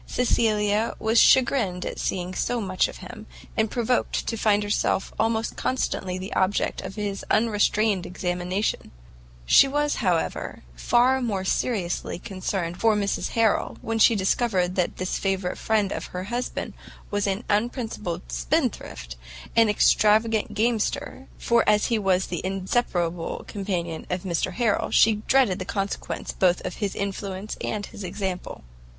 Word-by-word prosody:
Cecilia 215 -3 +1
was 225 +1 +3
chagrined 235 -9 +3
at - - -5
seeing 180 0 -2
so 240 +6 -1
much 185 -3 +1
of - - -9
him, 215 +3 -10 0.3
and 220 -1 +1
provoked 240 +1 0
to 230 - -2
find 210 -2 +2
herself 205 -1 0
almost 225 0 0
constantly 190 -7 -2
the 185 +2 -6
object 190 +2 0
of - - -7
his 205 -2 -3
unrestrained 215 -3 +2
examination; 180 +2 -2 0.6
she 275 - +7
was, 290 +1 0
however, 180 - -1
far 250 - +3
more 205 -6 -1
seriously 190 -6 -1
concerned 185 -3 -4
for 225 -1 +4
Mrs 200 -1 -1
Harrel, 225 -2 +2
when 225 0 -2
she 225 - +6
discovered 190 -2 +1
that 180 -2 -1
this 185 0 -2
favourite 190 -2 -1
friend 210 -3 +1
of - - -4
her 180 0 -5
husband 240 +5 -4 0.4
was 205 0 0
an 195 +4 -1
unprincipled 210 - -2
spendthrift, - - -2 0.4
and 230 -1 +5
an 210 - +1
extravagant 220 +2 +3
gamester, 240 +5 -1
for 235 0 +2
as 210 0 +3
he 225 - +2
was 190 -2 +2
the 175 - -4
inseparable 185 -3 -1
companion 180 -5 -4
of 180 0 -2
Mr 175 -3 -1
Harrel, 230 -4 +1
she 220 -1 +5
dreaded 255 -9 +3
the - - -2
consequence 195 +1 -3
both 180 -2 +2
of - - -4
his 200 -2 -2
influence 200 0 -4
and 210 -2 -2
his 205 - -10
example. 185 - -4
205 Hz, 145 wpm, -25 LUFS, 185-225 Hz, 0.6 s, she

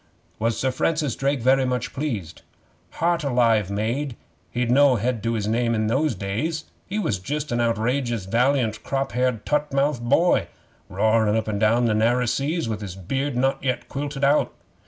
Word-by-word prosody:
'Was 115 0 0
Sir 130 - +1
Francis 150 -1 0
Drake 140 -1 0
very 130 +2 +4
much 125 -1 -2
pleased?' 110 - -4 0.5
'Heart 170 -1 0
alive, 115 -7 +2
maid, 115 +6 -2 0.3
he'd 120 -1 -1
no 140 0 +5
head 120 0 -1
to 115 +2 -1
his 105 -2 -2
name 115 +1 +1
in 110 0 0
those 135 +4 +1
days. 115 - -3 0.2
He 200 - -3
was 110 - -1
just 145 +9 -4
a 120 - 0
outrageous, 120 -1 0
valiant, 120 +1 +1
crop 135 0 -2
haired, 125 -3 0
tutt 150 0 0
mouthed 140 -2 0
boy, 170 +6 +3 0.4
roarin' 110 +2 +2
up 110 - -2
an' 105 -2 -2
down 115 +3 +3
the 115 - +2
narrer 120 +3 +2
seas, 145 +5 -1
with 110 -1 -3
his 95 -3 -6
beard 135 +9 -3
not 135 +2 0
yet 130 -2 -1
quilted 140 0 -4
out. 140 +2 +3
125 Hz, 175 wpm, -23 LUFS, 110-140 Hz, 0.5 s, no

